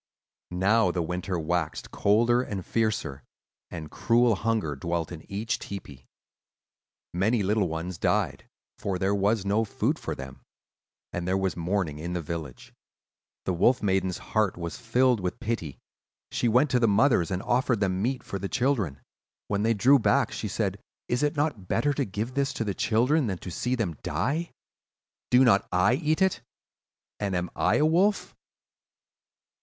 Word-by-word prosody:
"Now 95 Hz, +4 st, +3 dB
the 85 Hz, -1 st, -1 dB
winter 90 Hz, +2 st, -3 dB
waxed 80 Hz, -1 st, -2 dB
colder 115 Hz, +4 st, +3 dB
and 100 Hz, -7 st, -5 dB
fiercer, 110 Hz, -11 st, -1 dB, 0.5 s
and 80 Hz, -3 st, -7 dB
cruel 120 Hz, 0 st, +3 dB
hunger 105 Hz, -7 st, -1 dB
dwelt 85 Hz, +4 st, -3 dB
in 85 Hz, +1 st, -10 dB
each 105 Hz, +3 st, -2 dB
tepee. 70 Hz, -10 st, -9 dB, 1.1 s
Many 105 Hz, +5 st, +1 dB
little 100 Hz, 0 st, +1 dB
ones 80 Hz, +2 st, -5 dB
died, -, -, 0 dB, 0.3 s
for 95 Hz, -2 st, -2 dB
there 95 Hz, +2 st, +1 dB
was 100 Hz, +1 st, +1 dB
no 105 Hz, +3 st, +2 dB
food 110 Hz, -, -1 dB
for -, -, -4 dB
them; 65 Hz, 0 st, -9 dB, 0.7 s
and 90 Hz, 0 st, -3 dB
there 95 Hz, +1 st, +2 dB
was 95 Hz, -1 st, -1 dB
mourning 85 Hz, -3 st, -1 dB
in 85 Hz, +3 st, -4 dB
the 90 Hz, -, -1 dB
village. 75 Hz, -4 st, -7 dB, 0.7 s
The 95 Hz, -, 0 dB
Wolf 120 Hz, +9 st, +3 dB
Maiden's 95 Hz, -2 st, +1 dB, 0.2 s
heart 105 Hz, -5 st, +2 dB
was 85 Hz, -1 st, -5 dB
filled 125 Hz, 0 st, +2 dB
with 90 Hz, -1 st, -3 dB
pity; 110 Hz, -, -3 dB, 0.5 s
she 120 Hz, -, 0 dB
went 125 Hz, +5 st, +3 dB
to 125 Hz, -, +3 dB
the 115 Hz, -, +3 dB
mothers 110 Hz, -, +3 dB
and 95 Hz, 0 st, -2 dB
offered 125 Hz, -2 st, +1 dB
them 95 Hz, -2 st, 0 dB
meat 125 Hz, +4 st, -1 dB
for 100 Hz, -, -5 dB
the 100 Hz, +1 st, -4 dB
children. 120 Hz, -, 0 dB, 0.5 s
When 100 Hz, 0 st, 0 dB
they 115 Hz, +1 st, +2 dB
drew 135 Hz, +7 st, +5 dB
back -, -, +2 dB
she -, -, -4 dB
said, -, -, -2 dB, 0.3 s
'Is 120 Hz, -, +1 dB
it 150 Hz, +1 st, +1 dB
not 145 Hz, -11 st, -1 dB
better 145 Hz, +8 st, +1 dB
to 140 Hz, -1 st, -1 dB
give 105 Hz, +5 st, -4 dB
this 135 Hz, 0 st, 0 dB
to -, -, -2 dB
the 100 Hz, -3 st, -2 dB
children 125 Hz, -, +2 dB
than 95 Hz, -3 st, -2 dB
to 90 Hz, -, -8 dB
see 125 Hz, +9 st, -1 dB
them 100 Hz, -10 st, -2 dB
die? 160 Hz, +5 st, -1 dB, 0.8 s
Do 125 Hz, +1 st, +6 dB
not 110 Hz, -6 st, +4 dB
I 90 Hz, +6 st, +3 dB
eat 155 Hz, +5 st, +1 dB
it, 190 Hz, -, +1 dB, 0.8 s
and 100 Hz, -2 st, -1 dB
am 90 Hz, 0 st, -2 dB
I 105 Hz, -, +2 dB
a 150 Hz, -, +3 dB
wolf? 185 Hz, +6 st, +2 dB
100 Hz, 170 wpm, -27 LUFS, 90-120 Hz, 1.1 s, Do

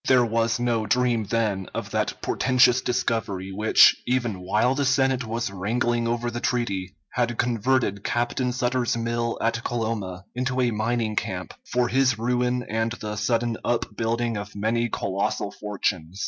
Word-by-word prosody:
There 125 Hz, -2 st, +5 dB
was 115 Hz, 0 st, +1 dB
no 115 Hz, -3 st, 0 dB
dream, 120 Hz, -3 st, +2 dB
then, 105 Hz, -3 st, -1 dB
of -, -, -4 dB
that -, -, -1 dB
portentous 130 Hz, -1 st, +3 dB
discovery 105 Hz, -6 st, -1 dB
which, 105 Hz, +3 st, +6 dB
even 120 Hz, -6 st, 0 dB
while 105 Hz, +7 st, +2 dB
the 140 Hz, +1 st, 0 dB
Senate 135 Hz, -1 st, +2 dB
was 115 Hz, -1 st, -2 dB
wrangling 115 Hz, +4 st, 0 dB
over 120 Hz, 0 st, -1 dB
the 120 Hz, -, -4 dB
treaty, 105 Hz, -8 st, -2 dB, 0.2 s
had 120 Hz, -1 st, 0 dB
converted 120 Hz, -3 st, +1 dB
Captain 120 Hz, +1 st, 0 dB
Sutter's 125 Hz, -1 st, 0 dB
mill 115 Hz, 0 st, -1 dB
at 115 Hz, +1 st, 0 dB
Coloma 105 Hz, -6 st, -3 dB
into 125 Hz, +1 st, -1 dB
a 125 Hz, -2 st, +2 dB
mining 110 Hz, 0 st, -1 dB
camp, -, -, -3 dB, 0.2 s
for 125 Hz, 0 st, +2 dB
his 130 Hz, 0 st, +2 dB
ruin 125 Hz, +1 st, 0 dB
and 110 Hz, +1 st, -1 dB
the 105 Hz, -3 st, -5 dB
sudden 115 Hz, +2 st, 0 dB
up 120 Hz, 0 st, -1 dB
building 115 Hz, 0 st, -1 dB
of 100 Hz, 0 st, -7 dB
many 115 Hz, +3 st, 0 dB
colossal 100 Hz, 0 st, -2 dB
fortunes. 95 Hz, -4 st, -3 dB
115 Hz, 155 wpm, -25 LUFS, 105-125 Hz, 0.2 s, which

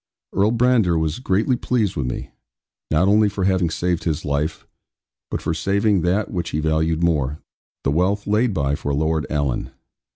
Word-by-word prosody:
Earl 100 Hz, +3 st, +3 dB
Brandir 115 Hz, -8 st, +3 dB
was 80 Hz, +2 st, -1 dB
greatly 115 Hz, +2 st, +1 dB
pleased 115 Hz, -5 st, 0 dB
with 70 Hz, -4 st, -2 dB
me, -, -, -5 dB, 0.6 s
not 80 Hz, +5 st, +3 dB
only 105 Hz, +1 st, +4 dB
for 100 Hz, -1 st, -3 dB
having 95 Hz, -3 st, +2 dB
saved 85 Hz, +1 st, -1 dB
his 80 Hz, -3 st, -2 dB
life, 75 Hz, +2 st, -2 dB, 0.6 s
but -, -, -4 dB
for -, -, 0 dB
saving 100 Hz, -1 st, +1 dB
that 95 Hz, +5 st, 0 dB
which 85 Hz, -3 st, -3 dB
he 75 Hz, -, -2 dB
valued 80 Hz, +1 st, +1 dB
more, 75 Hz, -4 st, +1 dB, 0.5 s
the 70 Hz, -, +1 dB
wealth 95 Hz, +6 st, +1 dB
laid 110 Hz, +4 st, +2 dB
by 70 Hz, -6 st, 0 dB
for 70 Hz, 0 st, -2 dB
Lord 80 Hz, +1 st, 0 dB
Alan. 70 Hz, -4 st, -1 dB
85 Hz, 170 wpm, -21 LUFS, 75-100 Hz, 0.6 s, only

